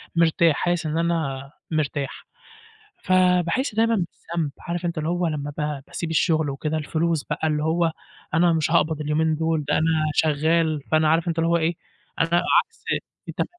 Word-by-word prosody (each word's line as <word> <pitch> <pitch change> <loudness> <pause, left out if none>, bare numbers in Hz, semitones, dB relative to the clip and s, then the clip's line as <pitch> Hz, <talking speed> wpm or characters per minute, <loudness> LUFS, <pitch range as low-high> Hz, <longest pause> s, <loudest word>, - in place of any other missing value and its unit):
مرتاح، 165 -1 +3
حاسس 175 0 -1
إن 155 +1 -1
أنا 155 -5 -1 0.2
مرتاح. 145 -3 -2 0.8
فاباحس 185 - +2
دايمًا 230 +1 +3
بالذنب 170 -4 -3
عارف 175 +1 -4
أنت 170 -1 -2
اللي 155 +1 -1
هو 175 0 0
لما 145 -2 -3
ب 150 -2 -3
باسيب 170 - -5
الشغل 160 -2 +2
وكده، 150 +3 -2
الفلوس 160 0 -1
بقى، 155 +1 -2
اللي 150 -1 0
هو 165 +1 +1 0.4
أنا 170 +1 +4
مش 160 0 0
هاقبض 160 -2 +2
اليومين 155 +1 +1
دول. 160 -1 -1
أنا - - +2 0.3
شغال، 155 0 +2
فأنا 155 -1 +4
عارف 165 +2 +2
أنت 170 -1 -1
اللي 165 0 +2
هو 170 - +3
إيه، 165 +1 0 0.4
أنا 165 - +2 0.3
عكس - - -7 0.4
التم - - -1
160 Hz, 165 wpm, -23 LUFS, 155-170 Hz, 0.8 s, أنا